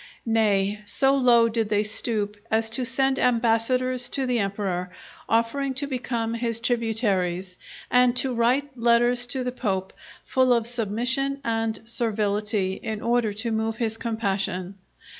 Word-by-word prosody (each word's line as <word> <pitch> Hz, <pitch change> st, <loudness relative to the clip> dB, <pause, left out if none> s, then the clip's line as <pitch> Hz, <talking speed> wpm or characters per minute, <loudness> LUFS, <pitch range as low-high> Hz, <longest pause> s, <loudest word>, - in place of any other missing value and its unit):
Nay, 210 Hz, -3 st, +2 dB
so 270 Hz, +4 st, +3 dB
low 240 Hz, -3 st, +5 dB
did 225 Hz, -2 st, -1 dB
they 210 Hz, 0 st, +2 dB
stoop 210 Hz, -1 st, -1 dB
as 225 Hz, 0 st, +1 dB
to 250 Hz, +3 st, +1 dB
send 265 Hz, +1 st, +1 dB
ambassadors 245 Hz, +2 st, +1 dB
to 270 Hz, -, -1 dB
the 250 Hz, -2 st, +1 dB
Emperor 195 Hz, -3 st, -2 dB, 0.4 s
offering 260 Hz, +4 st, +1 dB
to 280 Hz, +2 st, -2 dB
become 240 Hz, -4 st, -2 dB
his 230 Hz, -1 st, -2 dB
tributaries, 205 Hz, -6 st, -1 dB, 0.4 s
and 250 Hz, 0 st, +4 dB
to 255 Hz, 0 st, +1 dB
write 255 Hz, +4 st, +1 dB
letters 240 Hz, +1 st, +2 dB
to 255 Hz, +1 st, -2 dB
the 250 Hz, -, -2 dB
Pope, 195 Hz, -6 st, -2 dB, 0.3 s
full 260 Hz, -1 st, +3 dB
of 235 Hz, -2 st, +1 dB
submission 245 Hz, +4 st, -1 dB
and 225 Hz, -1 st, -1 dB
servility, 210 Hz, -4 st, -1 dB
in 220 Hz, -2 st, -4 dB
order 235 Hz, -2 st, +2 dB
to 220 Hz, +3 st, -3 dB
move 220 Hz, 0 st, -1 dB
his 225 Hz, -2 st, -1 dB
compassion. 195 Hz, -5 st, -2 dB
230 Hz, 140 wpm, -25 LUFS, 210-250 Hz, 0.4 s, low